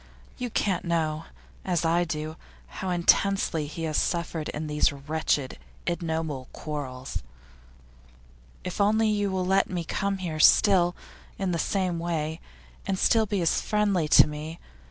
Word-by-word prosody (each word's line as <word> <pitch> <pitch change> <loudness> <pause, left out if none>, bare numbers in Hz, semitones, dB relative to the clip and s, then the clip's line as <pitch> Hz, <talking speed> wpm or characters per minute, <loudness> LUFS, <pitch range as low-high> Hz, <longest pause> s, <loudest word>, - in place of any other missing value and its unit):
You 250 -1 -2
can't 195 -5 0
know, 160 -2 -1 0.4
as 175 -3 0
I 170 +2 +3
do, 155 0 -4 0.3
how 185 - -6
intensely 175 -2 +2
he 160 +3 -6
has 155 -2 -1
suffered 170 -2 -1
in 150 +1 -4
these 150 0 +2
wretched, 140 - -2 0.3
ignoble 160 -6 -2
quarrels. 135 -4 -5 1.4
If 180 +2 -3
only 215 +2 +3
you 205 -1 +1
will 185 -1 -1
let 195 +1 +2
me 175 -2 -2
come 195 +4 -1
here 170 -4 -4
still, 175 +1 +5 0.4
in 190 -2 -1
the 170 - -1
same 180 -1 0
way, 160 -1 -2 0.5
and 195 -1 0
still 220 +2 +3
be 200 -2 -1
as 165 - +2
friendly 205 -6 +1
to - - +8
me. 155 +2 -6
170 Hz, 145 wpm, -27 LUFS, 155-190 Hz, 1.4 s, to